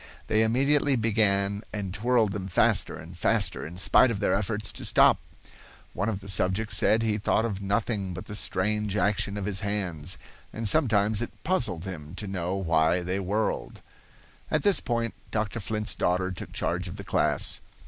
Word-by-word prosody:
They 110 - +2
immediately 140 +5 +3
began 100 -3 +1
and 100 -3 -4
twirled 115 0 +2
them 95 -1 -4
faster 90 - +2
and 85 +2 -11
faster, 95 -3 0
in 85 +2 -10
spite 120 +6 +5
of 110 -4 -2
their 100 - +1
efforts 105 +2 -1
to - - -5
stop. - - +5 0.7
One 100 +4 -1
of 100 -3 -3
the 100 - -11
subjects 95 +3 0
said 110 +1 +3
he 110 -1 0
thought 110 +2 +1
of 100 -4 -3
nothing 100 -2 -1
but 90 - -7
the - - -8
strange 105 +1 0
action 100 0 0
of 100 - -3
his 100 -2 -1
hands, 95 -7 -3 0.3
and 110 0 -3
sometimes 110 -6 +3
it 120 - -7
puzzled 120 - 0
him 80 -4 -7
to 105 - -5
know 95 -2 -2
why 85 -1 +2
they 90 +2 -1
whirled. 100 +3 -2 0.7
At - - 0
this 200 -6 +5
point 115 -2 -2 0.2
Dr. 110 +1 -2
Flint's 105 +1 -2
daughter 95 +1 0
took 90 - -7
charge 90 +1 -2
of 85 - -7
the 100 - -7
class. - - 0
100 Hz, 180 wpm, -27 LUFS, 95-110 Hz, 0.7 s, spite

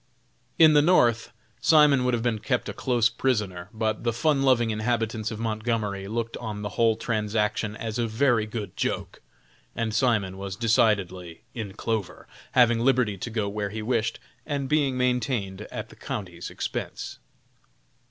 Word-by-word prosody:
In 160 -2 +7
the 145 - +6
North, 120 -9 +3 0.3
Simon 150 -4 +5
would 125 -1 +2
have 115 - -3
been 115 -3 0
kept - - -1
a - - -4
close 120 -3 +2
prisoner; 105 -7 -1
but 110 -1 -2
the 120 - +1
fun 135 +4 +1
loving 120 -4 +3
inhabitants 110 0 -1
of 110 - -5
Montgomery 110 -3 -2
looked 115 +2 -3
on 105 -3 -5
the 105 - -2
whole 115 +1 +2
transaction 105 -1 -1
as 110 +1 -4
a 115 - +1
very 115 -1 +2
good 105 -1 -6
joke, - - -3 0.5
and 115 -2 -2
Simon 105 -6 +1
was 100 -1 -5
decidedly 100 -5 +1
"in 105 -5 -5
clover," 110 -4 -3 0.3
having 120 -2 +5
liberty 125 -4 +2
to 120 - -4
go 110 -3 -1
where 100 0 -3
he 110 +1 -5
wished, 115 -1 0 0.2
and 140 -3 -3
being 140 -3 +1
maintained 125 -6 -1
at - - -6
the - - -14
county's 90 -5 -6
expense. - - -5
115 Hz, 160 wpm, -26 LUFS, 105-120 Hz, 0.5 s, In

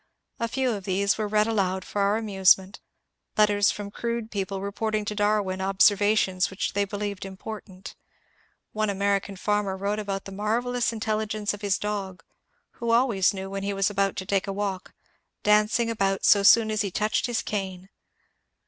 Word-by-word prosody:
A 230 - 0
few 255 +2 0
of 200 -4 -5
these 200 +2 +1
were 215 - 0
read 210 0 +2
aloud 190 -4 -1
for 205 - -3
our 200 +2 +2
amusement, 195 -2 +2 0.6
letters 205 -1 +4
from 205 -1 -4
crude 235 0 -4
people 195 -1 -3
reporting 215 +2 -2
to 210 - -3
Darwin 205 -2 0
observations 195 0 +3
which 190 - -3
they 200 +1 +1
believed 205 -1 -4
important. 195 -1 -9 0.8
One 215 -1 0
American 200 0 0
farmer 205 0 -1
wrote 200 +2 -2
about 195 -2 -4
the 195 - -8
marvellous 235 +5 -1
intelligence 215 -1 -2
of 205 - -9
his 200 -2 +1
dog, 200 -3 -4 0.6
who 235 -2 -2
always 230 -5 +3
knew 190 -1 -6
when 195 0 -4
he 200 +1 -2
was 195 +1 +1
about 195 -1 0
to 190 - -5
take 195 0 0
a - - -2
walk, 195 -2 -4 0.5
dancing 210 +3 +3
about 195 -3 0
so 200 - +6
soon 220 +2 +6
as 215 0 0
he 200 - -1
touched 215 +6 0
his 240 -2 -1
cane. 190 -2 -4
205 Hz, 170 wpm, -26 LUFS, 195-215 Hz, 0.8 s, so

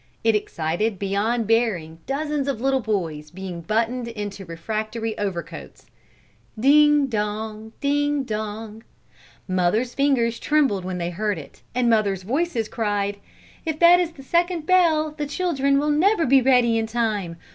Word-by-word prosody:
It 225 -1 +3
excited 190 +2 -1
beyond 205 +5 0
bearing 200 -8 0
dozens 290 +1 -2
of 270 -5 -1
little 265 +2 +1
boys 170 -10 -3
being 180 0 -7
buttoned 230 +5 -1
into 205 -4 -6
refractory 215 +6 -4
overcoats. 195 -4 -5 0.7
Ding 295 +3 +5
dong! 215 -1 -4
Ding 290 0 +1
dong! 215 -1 -5 0.7
Mothers' 185 +7 +1
fingers 250 -5 +1
trembled 275 -11 +1
when 185 -1 -3
they 175 0 -3
heard 205 +2 -1
it, 150 - -11
and 250 -1 +2
mothers' 205 -5 +2
voices 250 - -1
cried: 205 -3 -1 0.5
"If 320 -2 -2
that 345 +2 +7
is 345 -2 -1
the 270 - -13
second 340 +2 0
bell, 320 -4 +3
the 300 -1 -4
children 280 -4 +1
will 295 +1 +1
never 340 +4 +3
be 270 +1 +5
ready 245 -3 +4
in 225 - -2
time! 215 -7 -2
225 Hz, 145 wpm, -23 LUFS, 205-280 Hz, 0.7 s, that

